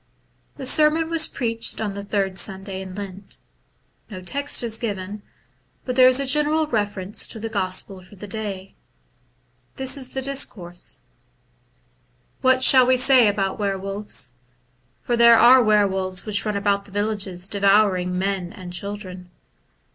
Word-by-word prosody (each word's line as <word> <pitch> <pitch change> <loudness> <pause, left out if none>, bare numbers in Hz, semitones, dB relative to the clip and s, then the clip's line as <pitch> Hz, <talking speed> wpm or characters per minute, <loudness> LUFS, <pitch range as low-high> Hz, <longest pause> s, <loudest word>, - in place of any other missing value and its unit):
The 270 - -7
sermon 310 +4 +3
was 325 -1 +2
preached 230 -2 -3
on 210 -2 -3
the 200 0 -7
third 195 -2 -2
Sunday 190 0 -4
in 190 -1 -9
Lent. 195 -1 -9 0.7
No 195 -4 -8
text 280 +10 0
is 225 -1 -2
given, 205 -2 -5 0.6
but 250 - -3
there 255 0 +7
is 255 +1 +5
a 275 - -2
general 300 +3 +1
reference 205 -5 -1
to 225 - -4
the 225 +1 -5
gospel 190 -2 -3
for 185 +3 -17
the 205 - -10
day. 195 -2 -6 1.0
This 265 +1 -1
is 260 -2 -7
the 265 - -3
discourse: 200 -10 -3 0.7
— - - -41
What 260 0 +3
shall 255 -2 +7
we 255 0 +4
say 255 -2 +5
about 200 -1 -1
were 200 -2 -1
wolves? 195 +2 -3 0.7
for 240 - 0
there 235 0 +7
are 250 +3 +7
were 210 -2 +4
wolves 190 -1 -2
which 210 -1 -2
run 210 -1 -1
about 200 0 0
the - - -17
villages 200 -3 -3
devouring 195 -3 +2
men 190 -2 -2
and 185 -4 -10
children. 185 -2 -6
205 Hz, 155 wpm, -22 LUFS, 190-245 Hz, 1.0 s, there